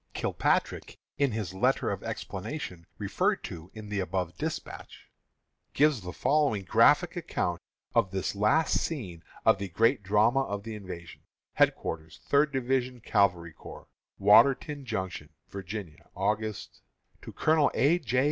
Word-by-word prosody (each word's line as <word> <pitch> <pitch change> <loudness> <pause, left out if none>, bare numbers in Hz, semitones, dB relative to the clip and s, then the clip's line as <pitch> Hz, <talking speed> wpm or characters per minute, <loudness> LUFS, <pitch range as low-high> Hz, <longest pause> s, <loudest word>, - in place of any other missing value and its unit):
Kilpatrick, - - -1 0.2
in 140 -2 +3
his 105 -5 -4
letter 95 - +1
of - - -4
explanation, 95 - -6
referred - - 0
to 85 +1 -8
in 110 -1 -9
the 105 -1 -2
above 90 -2 -2
despatch, - - -6 0.6
gives 145 -5 +3
the 90 -1 -6
following 140 -8 +1
graphic - - +4
account 85 -1 -2 0.3
of 95 - +3
this 95 0 -2
last 105 +10 +2
scene 95 - -5 0.2
in - - +6
the 100 -1 -4
great 115 +7 +2
drama 105 +6 +3
of 100 -5 -4
the 115 0 -6
invasion: 90 -5 -9 0.4
HEADQUARTERS 80 -1 0
THIRD 145 +1 +3
DIVISION 130 -1 -1
CAVALRY 90 -6 +1
CORPS, - - -12 0.3
Warrenton 140 +6 +4
Junction, 95 -6 -4 0.2
Va., 100 - -6
Aug.. 100 +3 -4 0.5
_To - - -10
Colonel 155 -2 +3
A. 160 +6 +3
J. 125 -5 0
105 Hz, 135 wpm, -28 LUFS, 95-130 Hz, 0.6 s, in